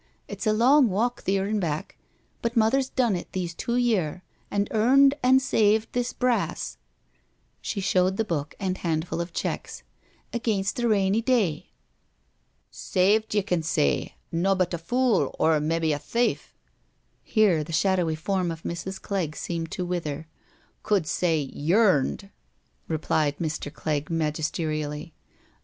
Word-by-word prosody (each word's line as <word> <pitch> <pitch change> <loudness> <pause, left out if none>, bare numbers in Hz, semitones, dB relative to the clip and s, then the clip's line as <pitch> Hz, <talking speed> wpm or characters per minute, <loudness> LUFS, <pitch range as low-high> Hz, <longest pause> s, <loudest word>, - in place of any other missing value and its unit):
It's - - -5
a - - +5
long 250 +4 +5
walk, 230 +6 0
theer 195 0 0
an' 210 +1 0
back, 155 -5 -3 0.5
but 235 +1 -2
Mother's 255 +4 +3
done 240 -6 +1
it 175 - -6
these 175 -2 -3
two 235 +7 -3
year, 195 -9 0 0.3
an' 200 0 0
earned 270 +5 +5
an' 260 +1 +5
saved 220 -4 +2
this 245 0 -1
brass 250 -2 -1 0.8
"—she 200 - -3
showed 185 0 +2
the 225 - 0
book 150 -6 -3
and 185 -1 -2
handful 165 0 -1
of 170 +1 -5
checks - - -4
— - - -35
" - - -39
against 220 -3 -1
a 240 - +1
rainy 200 0 +2
day. 220 - 0 1.0
Saved 210 +4 +1
ye 205 - +3
can 180 -3 0
say— 155 - 0 0.2
nobbut 185 +1 +1
a 170 - -2
fool, 230 - +1
or 160 -1 +3
mebbe 160 +1 0
a 145 - -2
thief 235 +10 -1 0.7
"—here 200 -9 +2
the 160 - -9
shadowy 175 -1 +1
form 180 +2 -1
of 165 0 -6
Mrs. 190 +3 -5
Clegg 180 -7 -3
seemed 165 -2 -4
to 180 - -3
wither 160 -4 -3
— - - -34
" - - -40
could 200 -6 +1
say 165 +1 +1
yearned,'* 175 +5 +1 0.6
replied 155 -2 0
Mr. 155 -3 -3
Clegg 150 -1 -3
magisterially. 155 -1 -2
185 Hz, 150 wpm, -26 LUFS, 160-220 Hz, 1.0 s, a